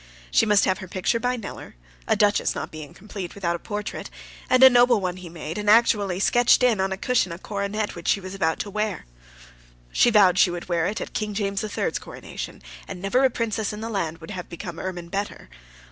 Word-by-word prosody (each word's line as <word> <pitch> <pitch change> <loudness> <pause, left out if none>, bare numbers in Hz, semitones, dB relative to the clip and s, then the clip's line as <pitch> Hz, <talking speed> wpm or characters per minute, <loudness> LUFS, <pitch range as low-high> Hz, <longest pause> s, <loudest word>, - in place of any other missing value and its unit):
She - - +4
must 210 -2 +4
have 190 0 +1
her 190 - -8
picture 185 +6 0
by 250 +1 0
Kneller, 215 - -8 0.3
a - - +3
duchess 205 -1 +2
not - - -5
being 155 -2 -9
complete 195 -3 -8
without 170 -4 -1
a - - -6
portrait, 210 +3 -5 0.4
and 255 0 +5
a - - +13
noble 245 -2 +5
one 185 -2 -3
he 180 -2 -9
made, 165 +2 -6
and 210 0 -1
actually 210 -4 +4
sketched 240 +4 +4
in, 235 -5 +3
on 190 0 0
a 190 - -2
cushion, 235 -4 +1
a 170 - -5
coronet 205 +2 -3
which 170 -1 -8
she - - +3
was 185 0 -8
about 175 -5 0
to 205 - -6
wear. 210 -2 -2 0.9
She - - +4
vowed 195 -5 +5
she 195 - +6
would 175 0 -5
wear 170 -1 +1
it 215 +3 -3
at - - -6
King 210 -1 -3
James 200 -1 -1
the 215 - -4
Third's - - -2
coronation, - - -8 0.2
and - - -7
never 195 +8 +1
a 265 - +5
princess 220 -3 -2
in 210 - -7
the 225 - -4
land 170 -7 -2
would 165 +2 -10
have 185 -3 -6
become 170 0 -7
ermine 175 -2 -5
better. 200 +2 -4
200 Hz, 225 wpm, -24 LUFS, 180-215 Hz, 0.9 s, a